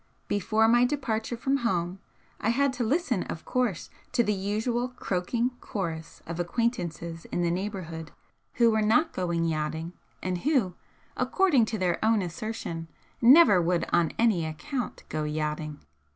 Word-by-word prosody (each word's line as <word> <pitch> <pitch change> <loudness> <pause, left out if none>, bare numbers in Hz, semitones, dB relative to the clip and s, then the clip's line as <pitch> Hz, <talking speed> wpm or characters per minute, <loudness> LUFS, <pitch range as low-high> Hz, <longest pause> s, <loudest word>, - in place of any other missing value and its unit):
Before 215 +2 +2
my 240 +2 +5
departure 240 -4 -1
from 270 +3 +1
home 185 -7 -1 0.4
I - - 0
had 275 +3 +2
to 245 -1 -2
listen, 310 +11 +1
of - - -6
course, 245 -9 -1 0.2
to 240 - +4
the 210 -1 +1
usual 220 +5 -1
croaking 235 +2 -1
chorus 165 -5 -5
of 170 +1 -5
acquaintances 175 -5 -2
in 175 - -2
the 170 - +1
neighbourhood 175 -4 -4 0.4
who 235 -2 +4
were 220 0 +2
not 275 +11 +3
going 170 -2 0
yachting 160 +1 -2 0.3
and 185 -1 -1
who, 255 - +1 0.4
according 340 - +3
to 220 0 -3
their 180 -1 0
own 220 -2 +3
assertion, 170 -2 -5 0.3
never 245 - +8
would 175 0 +1
on 170 -2 +3
any 220 -8 +3
account 240 - -4
go 155 -1 -2
yachting. 150 0 -3
205 Hz, 150 wpm, -28 LUFS, 170-240 Hz, 0.4 s, never